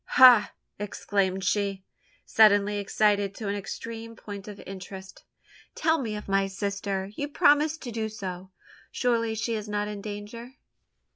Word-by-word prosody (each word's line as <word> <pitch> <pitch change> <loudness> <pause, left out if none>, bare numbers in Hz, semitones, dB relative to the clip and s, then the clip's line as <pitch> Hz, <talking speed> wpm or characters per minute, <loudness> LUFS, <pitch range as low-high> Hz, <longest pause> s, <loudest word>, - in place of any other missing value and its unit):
"Ha!" 245 -5 +8 0.3
exclaimed 195 -2 -1
she, 200 0 0 0.4
suddenly 205 -1 +4
excited 205 -1 +1
to 215 - -5
an 200 - 0
extreme 230 +3 -6
point 205 -2 -9
of 205 -1 -9
interest, 190 0 -9 0.5
"tell 320 0 +2
me 220 -4 -3
of 210 - -7
my 195 0 +2
sister! 195 0 -3
You 285 - -2
promised 295 +2 +3
to 240 - -5
do 220 -1 -2
so? 190 -3 -6 0.4
Surely 230 -2 0
she 230 +1 -2
is 215 -1 -4
not 205 0 -1
in 210 -1 -6
danger?" 215 +5 -8
205 Hz, 145 wpm, -27 LUFS, 195-230 Hz, 0.5 s, Ha